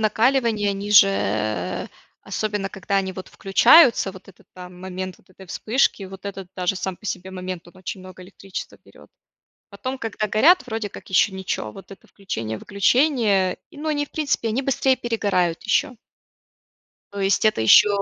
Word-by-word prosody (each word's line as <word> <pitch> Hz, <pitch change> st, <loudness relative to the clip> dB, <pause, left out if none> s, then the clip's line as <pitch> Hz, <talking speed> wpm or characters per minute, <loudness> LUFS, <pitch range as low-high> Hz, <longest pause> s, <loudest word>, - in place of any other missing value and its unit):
накаливания 220 Hz, -1 st, +2 dB
они 200 Hz, +1 st, -5 dB
же, 200 Hz, -1 st, +8 dB
э, 110 Hz, -, -2 dB, 0.3 s
особенно, 205 Hz, -2 st, -3 dB
когда 195 Hz, 0 st, -3 dB
они 190 Hz, -1 st, 0 dB
вот 185 Hz, 0 st, -9 dB
включаются, 230 Hz, -, +5 dB
вот 190 Hz, -1 st, -14 dB
этот, 185 Hz, -, -18 dB
там, 180 Hz, 0 st, -11 dB
момент 185 Hz, 0 st, -6 dB
вот -, -, -27 dB
этой 190 Hz, +1 st, -15 dB
вспышки, 220 Hz, +2 st, 0 dB
вот 190 Hz, 0 st, -10 dB
этот 195 Hz, -2 st, -7 dB
даже 180 Hz, +1 st, 0 dB
сам 190 Hz, -1 st, -4 dB
по 210 Hz, -, -12 dB
себе 185 Hz, 0 st, -4 dB
момент, 185 Hz, -2 st, -6 dB
он 180 Hz, -, -19 dB
очень 185 Hz, +1 st, -7 dB
много 185 Hz, 0 st, -12 dB
электричества 195 Hz, 0 st, -8 dB
берет. -, -, -18 dB, 0.6 s
Потом, 255 Hz, +6 st, -5 dB
когда 220 Hz, -3 st, -3 dB
горят 265 Hz, -, +4 dB
вроде 220 Hz, -3 st, -3 dB
как -, -, -12 dB
еще 190 Hz, +2 st, +3 dB
ничё, 185 Hz, -, -4 dB
вот 195 Hz, -, -13 dB
это 195 Hz, -, -14 dB
включение-выключение. 200 Hz, -, 0 dB
И, -, -, -16 dB
но 310 Hz, +2 st, -5 dB
они 290 Hz, -1 st, 0 dB
в -, -, -27 dB
принципе, 290 Hz, -7 st, -1 dB
они 245 Hz, +5 st, -1 dB
быстрее 265 Hz, -1 st, +1 dB
перегорают 200 Hz, -8 st, -1 dB
еще. 280 Hz, -4 st, +1 dB, 1.2 s
То 200 Hz, -, -5 dB
есть 195 Hz, +2 st, +1 dB
это 215 Hz, -, +3 dB
еще 190 Hz, -, +7 dB
195 Hz, 170 wpm, -22 LUFS, 185-225 Hz, 1.2 s, же